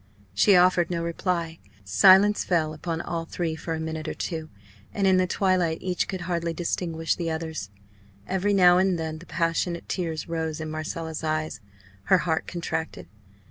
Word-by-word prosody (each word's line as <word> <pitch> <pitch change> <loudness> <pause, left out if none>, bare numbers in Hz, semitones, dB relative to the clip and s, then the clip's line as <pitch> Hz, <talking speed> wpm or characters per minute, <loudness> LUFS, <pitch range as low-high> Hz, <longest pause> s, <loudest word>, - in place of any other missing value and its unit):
She 145 - +5
offered 180 -1 +4
no 170 -2 -2
reply. 170 -1 -2 0.2
Silence 195 - +6
fell 160 -4 0
upon 165 +1 -4
all 165 -1 -4
three 165 -1 -3
for 160 +1 -4
a - - -5
minute 160 0 -4
or - - -3
two; 160 -3 -4 0.5
and 200 - +1
in 190 -1 +5
the 185 0 +2
twilight 180 -3 +1
each 180 -1 -1
could 190 -2 -4
hardly 170 -1 -2
distinguish 165 -1 -1
the 170 -2 -3
others. 160 -8 -4 0.6
Every 190 +2 0
now 180 -2 +6
and 190 -1 +2
then 160 -1 -4
the 175 - -14
passionate 170 +1 -1
tears 165 -4 -3
rose 160 -1 -3
in 155 0 -5
Marcella's 160 +1 -5
eyes; 155 -6 -2 0.4
her 190 - +5
heart 160 -3 -1
contracted. 160 - -4
165 Hz, 170 wpm, -26 LUFS, 160-180 Hz, 0.6 s, Silence